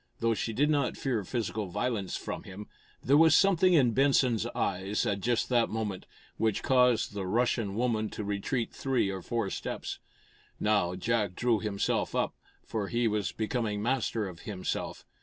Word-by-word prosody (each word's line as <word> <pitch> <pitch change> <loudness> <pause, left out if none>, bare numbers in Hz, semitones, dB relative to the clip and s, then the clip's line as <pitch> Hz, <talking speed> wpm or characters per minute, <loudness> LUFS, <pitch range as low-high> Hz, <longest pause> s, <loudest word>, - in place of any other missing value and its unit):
Though 115 0 +1
she 115 - -2
did 145 +7 +2
not 140 -4 +1
fear 120 -6 -1
physical 110 -1 -3
violence 100 +1 -2
from - - -5
him, 100 +2 -9 0.4
there 140 +3 +4
was 160 -1 +6
something 185 -1 +4
in 130 -6 +5
Benson's 130 -4 +3
eyes, 95 +2 -1
at 100 -1 -1
just 120 +3 +1
that 120 -2 +3
moment, 105 -4 -4 0.3
which 110 -2 0
caused 125 -4 +3
the 100 -2 -4
Russian 115 -1 0
woman 110 -2 0
to 105 - -5
retreat 105 +4 -2
three 130 -7 0
or 95 -1 -5
four 115 0 -2
steps. - - -4 0.6
Now 100 -4 +1
Jack 105 -1 0
drew 120 -1 +2
himself 100 -2 -1
up, - - 0 0.3
for 105 -3 -3
he 120 +2 +1
was 105 -2 -1
becoming 110 -2 -2
master 115 -3 0
of 90 -3 -9
himself. 95 -2 -4
110 Hz, 165 wpm, -29 LUFS, 100-125 Hz, 0.6 s, was